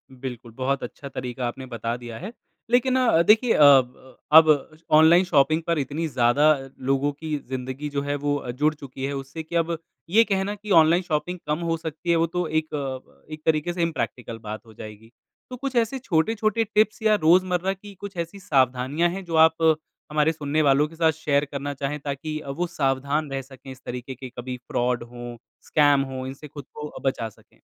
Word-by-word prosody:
बिल्कुल, 125 -2 -8
बहुत 130 +4 -2
अच्छा 140 +3 -8
तरीक़ा 125 -2 -4
आपने 130 +2 -6
बता 115 -2 -4
दिया 120 -2 -8
है। 200 +5 -6 0.4
लेकिन 250 +2 +3
अ, 230 -10 +4
देखिए 220 +6 +4
अ, 150 - +5 0.7
अब 155 -1 +6 0.2
ऑनलाइन 160 +4 +7
शॉपिंग 155 -1 +3
पर 170 -1 +1
इतनी 145 +4 -2
ज़्यादा 125 +1 +2 0.4
लोगों 135 +1 +2
की 155 +1 -4
ज़िंदगी 130 +3 -4
जो 140 -1 -2
है 145 0 -2
वो 145 -3 -2
जुड़ 150 +5 +1
चुकी 135 -3 -9
है 140 - -3
उससे 135 +4 -6
कि 160 +2 -8
अब 165 0 +1 0.3
ये 220 +6 +6
कहना 200 -1 -1
कि 210 0 -8
ऑनलाइन 165 +3 +3
शॉपिंग 175 +2 -2
कम 150 +2 0
हो 165 - +1
सकती 160 +1 -6
है 170 - +5
वो 165 0 +2
तो 180 +1 -2
एक 145 -5 -4
एक 155 0 -7
तरीक़े 160 +2 +1
से 175 - -3
इम्प्रेक्टिकल 130 -8 -3
बात 110 0 -7
हो 110 - -15
जाएगी। 110 +1 -11 0.4
तो 255 - -6
कुछ 270 +1 -4
ऐसे 235 +3 +1
छोटे-छोटे 215 +2 +1
टिप्स 215 +1 +1
या 215 -1 +4
रोज़मर्रा 180 +3 +3
की 200 +1 -13
कुछ 195 0 -9
ऐसी 170 +4 -4
सावधानियाँ 135 -1 +1
है 190 +3 -5
जो 170 -2 -4
आप 160 0 -1 0.5
हमारे 150 +1 +3
सुनने 150 -1 -1
वालों 145 0 +4
के 165 - -15
साथ 160 -1 +3
शेयर 150 -2 0
करना 145 0 -4
चाहें 140 +2 -3
ताकि 150 +2 -4
अ, 145 - -9
वो 170 +6 -2
सावधान 140 -1 -1
रह 135 0 -2
सके 135 0 -13
इस 130 0 -12
तरीक़े 125 +2 -6
के 130 +1 -9
कभी 125 +1 -5
फ्रॉड 125 0 0
हो, 120 0 -9 0.3
स्कैम 145 -2 +4
हो 130 0 -5
इनसे 135 +3 -8
खुद 145 -1 -10
को 150 0 -7
बचा 115 -4 -1
सकें। 105 - -25
150 Hz, 195 wpm, -24 LUFS, 130-170 Hz, 0.7 s, ऑनलाइन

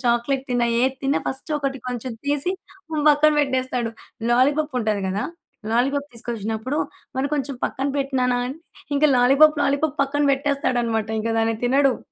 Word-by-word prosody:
Chocolate 240 +3 +1
తిన్నా, 245 -1 +2
ఏది 260 +1 +2
తిన్న 275 +1 +1
ఫస్ట్ 265 +4 -4
ఒకటి 270 -1 -2
కొంచెం 250 0 -4
తీసి 290 +5 0 0.6
పక్కన 300 +1 +4
పెట్టేస్తాడు. 255 -4 -1 0.4
లాలీపప్పు 285 +4 +2
ఉంటది 215 -2 0
గదా! 195 +2 -1 0.5
లాలీపాప్ 275 +5 0
తీసుకొచ్చినప్పుడు, 230 +2 -4 0.4
మరి 265 +1 +1
కొంచెం 275 -1 -2
పక్కన 270 +1 -2
పెట్టు 275 -1 -2
నాన 250 0 +2
అని 270 +5 -6 0.4
ఇంక 295 - +2
లాలీపాప్, 280 +5 +6
లాలీపాప్ 280 +1 +1
పక్కన 290 +1 -1
పెట్టేస్తాడన్నమాట. 250 -6 0
ఇంక 230 +1 -2
దాన్ని 225 0 +1
తినడు. 270 0 +3
265 Hz, 145 wpm, -22 LUFS, 240-280 Hz, 0.6 s, లాలీపాప్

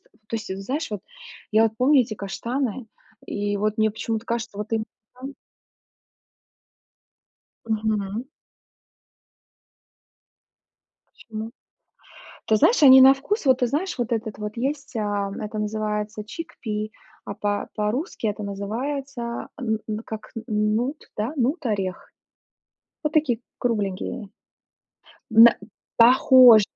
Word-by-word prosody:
то 215 +2 -12
есть, 215 -3 -4
знаешь, 285 +5 -3
вот 210 - -4 0.5
я 220 +1 +5
вот 220 -1 +1
помню 265 +4 +5
эти 225 -3 -2
каштаны, 235 +4 -3 0.4
и 205 0 -2
вот 215 +2 -1
мне 220 0 +3
почему-то 225 +1 -3
кажется 235 -3 -3
вот 210 +2 -5
им 225 - +1 0.3
там 265 +2 -8 2.3
Мгм. 215 0 -1 2.8
Почему? 220 0 -8 1.0
Ты 220 - +4
знаешь, 445 - +4
они 265 -2 +10
на 265 +1 +9
вкус, 285 +6 -3
вот 260 -1 +5
ты 245 - +3
знаешь, 310 +8 -2
вот 240 0 -2
этот 220 -2 -3
вот 210 +1 -5
есть, 275 +1 -3
а 205 -2 -1
это 215 0 -5
называется 210 0 -2
chickpea 215 -5 -5 0.3
а 200 - -6
по 205 0 -2
по-русски 220 - -2
это 210 0 -4
называется 235 +5 -4
н 220 -3 -1
н 215 0 -2
как 215 -1 -7
н 225 - -5 0.3
нут, 260 +6 -3
да, 215 +6 -2
нут 275 +3 0
орех, 195 -4 -3 0.9
вот 300 - -1
такие 290 -7 +2 0.2
кругленькие. 210 -1 -2 1.0
Мэ 225 +1 +9 0.4
похож 245 -1 +8
225 Hz, 120 wpm, -24 LUFS, 210-255 Hz, 2.8 s, они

